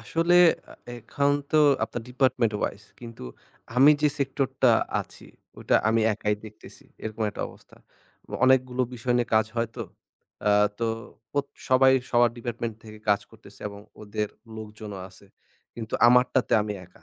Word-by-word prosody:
আসলে 165 +2 +1 0.4
আ - - -10 0.2
এ - - -6
এখন 140 +5 0 0.2
তো 155 - +2 0.3
আপনার 120 - -6
department 125 -3 +1
wise 105 +2 -4
কিন্তু 115 -1 -10 0.5
আমি 135 +4 +8
যে 150 - +5
sector 135 0 0 0.2
টা 130 - +7 0.3
আছি - - -12 0.3
ওটা - - 0
আমি 115 +1 +2
একাই 105 0 -1
দেখতেছি, 110 -1 -13 0.2
এরকম 110 0 -4
একটা - - -5
অবস্থা। - - -18 0.7
অনেকগুলো 130 -1 +3
বিষয় 125 +1 -1
নিয়ে 120 -1 0
কাজ 110 0 +4
হয় 115 -1 0
তো, - - -5 0.7
আ - - +5 0.3
তো 115 - -1 0.5
অত 140 - -1 0.2
সবাই 130 0 +5 0.2
সবার 120 -1 +4
department 115 -1 -4
থেকে 110 -1 -11
কাজ 100 0 +4
করতেছে 105 -3 -17
এবং 100 0 -11 0.2
ওদের 105 0 -3 0.3
লোকজনও 105 -2 -8
আছে। 95 +2 -17 0.5
কিন্তু 110 -2 -6
আমারটাতে 125 +1 +3
আমি 105 - -3
একা, 90 - -22
115 Hz, 155 wpm, -26 LUFS, 105-130 Hz, 0.7 s, আমি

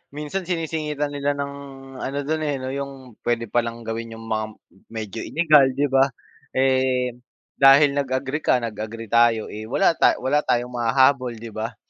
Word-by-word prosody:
minsan 150 +5 -4
sinisingitan 155 -4 -2
nila 145 0 -1
ng 140 0 -4 0.5
ano 140 +2 -4
dun 155 +2 -1
eh, 145 -2 -1
no 130 0 -5
yung 135 -4 -7
pwede 120 -1 -1
palang 115 -1 -1
gawin 115 0 -5
yung 115 - -10
mga 110 0 0 0.4
medyo 110 -1 -6
illegal 155 -4 +4
di 145 -1 0
ba? 135 0 +5 0.5
Eh, 130 -1 +2 0.5
dahil 140 +1 +7
nag-agree 135 0 -2
ka, 125 -5 +1
nag 110 -3 -5
agree 110 0 -6
tayo 115 -2 +3
eh, 110 +1 -7
wala 190 +9 +3
ta - - +3
wala 145 +3 +2
tayong 125 -3 -1
mahahabol 125 +1 +2
di 115 0 -9
ba? 110 +2 -5
130 Hz, 165 wpm, -23 LUFS, 115-145 Hz, 0.5 s, dahil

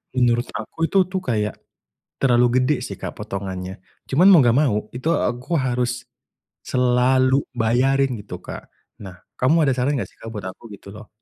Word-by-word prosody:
menurut 120 -1 +2
aku 165 0 -3
itu 195 - 0
tuh 190 - -1
kayak 105 - -1 0.7
terlalu 125 -1 +3
gede 130 +4 +2
sih, - - -6
Kak, - - -6
potongannya. 95 -1 -6 0.2
Cuman 175 +9 +4
mau 170 -9 +7
enggak 120 - +4
mau 130 -9 +2 0.2
itu 130 +6 -4
aku 125 +7 -1
harus 125 -2 -1 0.6
selalu 130 +2 +2
bayarin 125 +3 +1
gitu, 100 -4 -8
Kak. - - -10 0.3
Nah 90 -2 -10 0.2
kamu 150 +3 +2
ada 135 - +3
saran 130 +3 0
nggak - - -4
sih, - - -26
Kak, 115 - -10
buat 100 -4 -6
aku 95 - -10
gitu 100 0 -11
loh? 110 0 -12
125 Hz, 170 wpm, -21 LUFS, 110-135 Hz, 0.7 s, mau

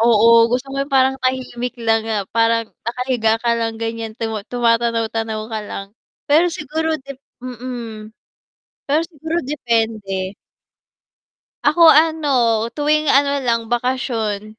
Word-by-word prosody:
Oo, 225 -1 +4 0.2
gusto 250 +2 -1
ko - - -5
yung 275 - -3
parang 265 0 +4
tahimik 255 -1 -2
lang 225 -1 +1
nga, 210 -3 -1
parang 230 0 +2 0.2
nakahiga 235 -2 0
ka 235 - +1
lang 225 -1 -2
ganyan 225 -1 -5
tuma 225 -2 -3
tumatanaw-tanaw 230 -2 0
ka 220 - -2
lang. 195 - -6 0.4
Pero 315 +5 +5
siguro 320 0 -2
'de 275 -2 -14 0.3
mm. 240 -3 -7 0.8
Pero 295 +3 +3
siguro 320 0 -5
depende. 225 -8 -1 1.3
Ako 315 +3 +5
ano, 315 0 +3 0.5
tuwing 305 +1 +1
ano 280 0 +3
lang, 230 -3 -1
bakasyon. 230 -4 -2
240 Hz, 125 wpm, -19 LUFS, 225-275 Hz, 1.3 s, Pero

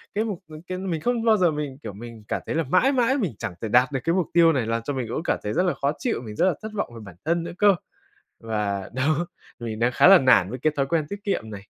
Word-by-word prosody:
Cái 215 - +1
mục 205 -6 -5
mình 155 0 -11
c - - -9
mình 185 -3 -3
không 240 +5 0
bao 220 -2 +5
giờ 180 -4 +3
mình, 150 -3 -4
kiểu, 110 - -6
mình 115 +1 -10
cảm - - -2
thấy - - -3
là 165 - +1
mãi 185 - +3
mãi 265 0 +2
mình 195 - -1
chẳng - - -4
thể 110 - -2
đạt 125 +4 +4
được 135 - -1
cái 165 +4 +1
mục 185 -4 +1
tiêu 165 -1 +6
này 130 -5 0
làm 115 0 -1
cho 145 - -3
mình 130 -3 -3
cũng 150 - -3
cảm - - 0
thấy 105 - -2
rất 180 - +2
là 180 - +1
khó 140 +1 -1
chịu, 245 - -1
mình 110 -3 -8
rất - - +2
là 185 - +3
thất 215 0 -6
vọng 200 - -3
về - - -8
bản 95 -4 -12
thân 170 +1 +1
nữa 170 - -6
cơ. 205 -2 +5 0.6
Và, 105 -3 -3
đó, 155 +6 0 0.3
mình 115 -2 -5
đang 120 +2 +2
khá 120 - +5
là 195 0 +10
nản 130 -8 +4
với 125 - -6
cái 155 +4 +1
thói 140 - +2
quen 155 +1 0
tiết 200 0 -7
kiệm 150 - -2
này. 100 -2 -7
150 Hz, 300 wpm, -24 LUFS, 115-185 Hz, 0.6 s, là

